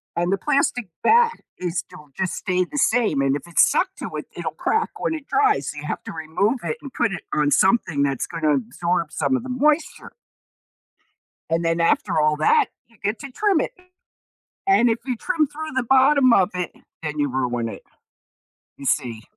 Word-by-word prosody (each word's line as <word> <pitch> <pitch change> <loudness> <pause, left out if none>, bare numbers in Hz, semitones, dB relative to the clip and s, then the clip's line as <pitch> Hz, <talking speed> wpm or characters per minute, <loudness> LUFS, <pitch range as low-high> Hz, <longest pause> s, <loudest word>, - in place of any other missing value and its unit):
and 175 +2 +1
the 195 - +1
plastic 250 -7 0
bat 470 0 +5 0.3
is 175 -1 -3
still 150 -1 -7
just 190 -2 -1
stay 185 -2 0
the 290 - -8
same, 225 - +2
and 135 0 +2
if - - -12
it's 170 - +5
stuck - - +2
to - - -5
it, - - -5
it'll - - -3
crack 445 0 0
when - - -1
it 310 -3 -6
dries, 420 +4 +2
so, 150 - -7
you 150 - -6
have - - -4
to - - -7
remove 165 +10 -1
it 155 -2 -2
and 275 - -9
put 235 -5 0
it 175 - -5
on 150 -1 +2
something 175 - +3
that's 135 -3 0
gonna 155 -3 +1
absorb 165 +7 -1
some 260 - 0
of 245 - -6
the 260 - -7
moisture. 295 +5 0 1.4
And 165 +1 +1
then, 165 0 +1
after 165 - +2
all 150 0 +2
that, 430 - +4 0.2
you 230 - -25
get 205 +2 -1
to 275 - -8
trim 400 0 +2
it. - - -3 1.0
And 390 -11 +5
if 225 - 0
you 250 -3 -2
trim 320 +2 0
through 310 +2 -7
the 260 - +1
bottom 265 0 +5
of 190 -3 +4
it 180 -1 -3 0.3
then 150 -1 -4
you 145 - +1
ruin 120 -3 -1
it, - - -8 0.9
you 140 - -10
see? 115 -4 0
190 Hz, 200 wpm, -22 LUFS, -, 1.4 s, bat